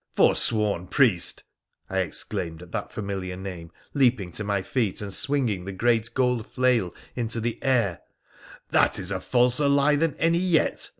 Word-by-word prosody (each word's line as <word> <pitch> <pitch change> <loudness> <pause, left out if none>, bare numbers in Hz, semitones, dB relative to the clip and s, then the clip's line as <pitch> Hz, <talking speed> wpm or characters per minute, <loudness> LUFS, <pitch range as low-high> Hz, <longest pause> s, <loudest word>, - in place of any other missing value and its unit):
' - - -36
Forsworn 105 -5 +2
priest! 110 -10 +2 0.2
' - - -54
I 95 - -1
exclaimed 85 -2 -3
at 85 - -15
that - - -4
familiar 95 -3 -4
name, 90 -4 -7 0.2
leaping 120 -10 +2
to 105 - -5
my 100 -2 -1
feet 110 -6 -1
and 100 -2 -4
swinging 120 -11 0
the 95 - -5
great 115 +3 +1
gold 125 -4 +1
flail 125 -8 +1 0.2
into 115 -1 -2
the 115 +1 -3
air, 120 -10 +1 0.4
' - - -20
that - - +3
is 95 0 -3
a 95 - -1
falser 125 +7 +2
lie 140 +1 +4
than 160 +1 0
any 165 +1 +2
yet. 180 -3 +1
110 Hz, 175 wpm, -25 LUFS, 95-130 Hz, 0.4 s, lie